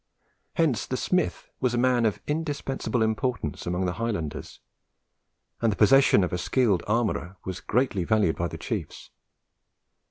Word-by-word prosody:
Hence 155 - +1
the 130 - -2
smith 180 +5 -1
was 125 -2 +1
a - - 0
man 120 -2 +3
of 105 - -2
indispensable 145 -6 -1
importance 110 - -2
among 90 +2 0
the 90 - -1
Highlanders, 100 -11 -4 1.0
and 115 -1 +3
the - - -2
possession 135 -2 +6
of 90 - -2
a 90 - -1
skilful 110 -4 +2
armourer 105 -5 0
was 95 -1 -4
greatly 115 -6 0
valued 105 -4 +2
by 85 - -1
the - - -7
chiefs. - - -5
115 Hz, 150 wpm, -26 LUFS, 95-130 Hz, 1.0 s, possession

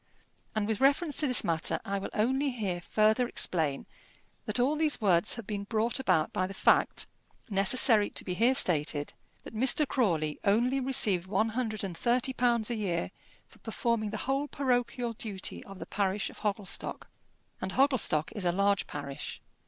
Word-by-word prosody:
And 210 -1 -1
with 220 +1 -2
reference 285 +2 +3
to 300 - +4
this 250 - +2
matter, 165 -1 0
I 200 0 -2
will 195 - -6
only 265 +6 +1
here 200 -8 -3
further 215 +6 +2
explain 155 -11 +1 0.6
that - - 0
all 270 +5 +2
these 305 -1 0
words 190 -2 +3
have 230 -3 -8
been 200 -1 -5
brought 225 +4 -1
about 180 -11 +1
by 185 - -1
the 195 - -8
fact, - - +2 0.5
necessary 210 +2 +5
to - - -6
be 180 - -4
here 235 +8 +2
stated, 150 - +1 0.3
that - - -11
Mr. 260 +6 +3
Crawley 165 - 0
only 240 +7 +2
received 225 -9 +3
one 215 +3 0
hundred 220 -3 -3
and 185 -3 -5
thirty 245 +7 0
pounds 240 -2 +1
a - - -1
year 175 - -2 0.4
for - - -21
performing 225 -1 -2
the 215 - -5
whole 275 +2 -1
parochial 245 -3 -1
duty 205 -4 -4
of 195 -1 -11
the - - -8
parish 200 0 -2
of - - -15
Hogglestock. 205 -2 -4 0.5
And 185 - -3
Hogglestock 255 - +2
is 205 - -5
a 175 - +2
large 200 +2 +1
parish. 140 -1 -7
215 Hz, 175 wpm, -29 LUFS, 190-250 Hz, 0.6 s, necessary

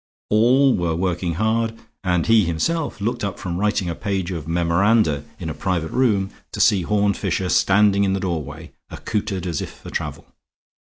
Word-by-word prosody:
All 125 +5 +5
were 85 -2 -1
working 90 -1 -1
hard; 110 +3 0 0.3
and 90 -3 +1
he 115 -1 +5
himself 140 - -1
looked 120 +3 -2
up 100 -2 -3
from 90 -1 -4
writing 105 -2 0
a 85 - -2
page 95 0 -3
of 80 -4 -5
memoranda 85 -1 +2
in 85 - -6
a 80 - -3
private 80 +1 -2
room 105 -6 +1 0.2
to - - -5
see 105 -5 +4
Horne 100 +2 +1
Fisher 95 -1 -2
standing 100 +1 +4
in 95 -1 +1
the 95 - -1
doorway, 80 -3 -4 0.2
accoutered 100 -4 -3
as 85 -5 -2
if - - -6
for - - -12
travel. - - -4
95 Hz, 175 wpm, -21 LUFS, 85-105 Hz, 0.3 s, All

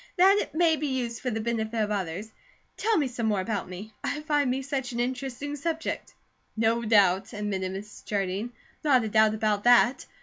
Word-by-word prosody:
"That 385 +3 +6
it - - -7
may 325 -1 +4
be 300 +1 -2
used 245 -3 -2
for 255 - -1
the 225 -2 -2
benefit 225 0 -2
of 210 -1 0
others. 195 +2 -3 0.4
Tell 445 -1 +1
me 290 - +2
some 235 -2 -3
more 210 -3 +1
about 200 -1 -3
me. 200 +4 -8
I 300 - -2
find 295 -3 +1
me 265 +2 -1
such 265 -2 -3
an 235 - -3
interesting 260 +3 -3
subject." 320 +2 -3 0.4
"No 225 +1 +2
doubt!" 200 -4 +3
admitted 195 -3 -2
Mrs. 205 +2 -8
Jardine. 200 +3 -2 0.3
"Not 265 -5 +4
a 220 - -2
doubt 215 0 +4
about 210 -1 0
that! 245 +1 +5
230 Hz, 195 wpm, -27 LUFS, 210-270 Hz, 0.4 s, That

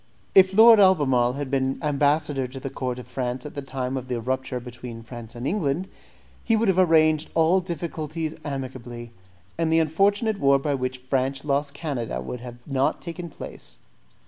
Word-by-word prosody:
If 190 0 +6
Lord 225 +1 +9
Albemarle 135 -11 +4
had 140 0 -5
been 135 -1 0
ambassador 145 -2 +1
to 130 +2 -9
the 135 0 -6
court 125 -2 -3
of 125 - -8
France 125 0 -4
at 150 - -7
the 140 - -4
time 130 -1 -4
of 130 -1 -4
the 125 -2 -2
rupture 130 +1 -2
between 120 -1 -9
France 120 -1 -10
and 120 +2 -6
England, 165 0 -1 0.6
he 225 - +2
would 220 -1 +2
have 185 -1 +3
arranged 155 -3 +4
all 165 +3 +4
difficulties 160 -2 -4
amicably, 125 -4 -6 0.5
and 165 -1 +1
the 160 - +4
unfortunate 200 +7 +2
war 140 -1 +5
by 145 +1 -1
which 130 -1 -2
France 135 +1 -1
lost 140 0 0
Canada 125 - -3
would 115 - -6 0.2
not 135 -1 +1
have - - -20
taken 170 0 -6
place. - - -10
140 Hz, 175 wpm, -24 LUFS, 130-165 Hz, 0.6 s, Lord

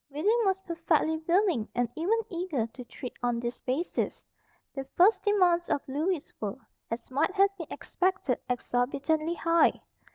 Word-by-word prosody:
William 380 +12 +2
was 385 -1 +2
perfectly 330 -3 +1
willing 350 - +2
and 245 0 +2
even 365 +8 +1
eager 340 - -2
to 240 +3 -10
treat 245 +1 -8
on 240 -1 0
this 240 0 -4
basis. 275 +8 -2 0.5
The 270 - -4
first 390 +6 +6
demands 360 -5 +3
of 280 - -1
Lewis 310 +4 -1
were, 210 +2 -3 0.3
as 230 +3 -5
might 300 +8 +1
have 395 0 +4
been 335 -5 -7
expected, 370 -9 -1
exorbitantly 275 +7 0
high. 335 0 +3
320 Hz, 150 wpm, -29 LUFS, 255-370 Hz, 0.5 s, first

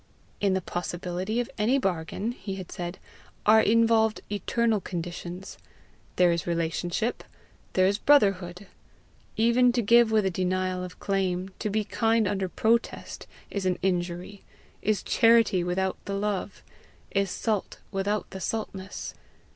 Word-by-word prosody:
"In 195 -2 +2
the 190 - 0
possibility 180 +5 -3
of 245 - -1
any 235 +6 +3
bargain," 195 0 -1
he 200 -5 -6
had 185 -2 -8
said, 175 +1 -5 0.5
"are 220 +1 +7
involved 225 0 +3
eternal 220 +1 +1
conditions: 175 +1 -6 0.6
there 180 -1 +5
is 170 0 -2
relationship 170 +6 -1 0.5
there 185 - +4
is 200 +2 +2
brotherhood. 195 -9 +3 0.7
Even 235 +2 +4
to 240 -1 +1
give 235 +2 +6
with 215 -2 +3
a 190 - +1
denial 185 0 -1
of 180 0 -9
claim, 190 -1 -1
to 215 - -1
be 215 +1 0
kind 225 0 +1
under 190 -1 -1
protest, 230 +5 -1 0.2
is 195 -2 -1
an 180 - +1
injury, 180 +1 -2 0.4
is 210 -2 0
charity 225 -5 +4
without 185 +2 -1
the 200 - -3
love, 200 -1 -3 0.5
is 195 -1 +1
salt 210 +1 -2
without 205 +1 -1
the 190 - -6
saltness. 195 -3 -4
195 Hz, 140 wpm, -27 LUFS, 180-220 Hz, 0.7 s, are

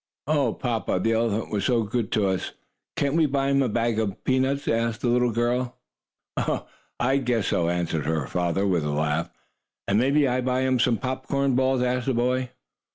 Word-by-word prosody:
"Oh, 140 -5 +1
papa, 115 -6 -1
the 115 +5 +1
elephant 115 -1 0
was 100 -2 -1
so 120 -3 +2
good 110 0 -2
to 105 -2 +2
us, 95 -1 -2 0.4
can't 140 0 0
we 160 -1 +3
buy 135 0 0
him 140 0 +3
a 130 - +1
bag 115 0 0
of 105 -3 -3
peanuts?" 135 +2 +1
asked 115 0 0
the 120 - +1
little 125 0 +3
girl. 120 +2 -1 1.2
"I 130 +3 +2
guess 120 -6 0
so," 85 -1 +1
answered 85 -4 -1
her 80 -3 0
papa, 90 +6 -1
with 90 -5 +1
a 75 - -2
laugh. 75 +3 0 0.6
"And 100 +2 +3
may 140 +4 +3
I 130 -1 +1
buy 125 0 0
him 130 -1 +1
some 115 -1 +3
popcorn 135 +3 -1
balls?" 130 0 +2
asked 125 0 -1
the 135 - +1
boy. 125 +1 0
120 Hz, 190 wpm, -25 LUFS, 100-130 Hz, 1.2 s, we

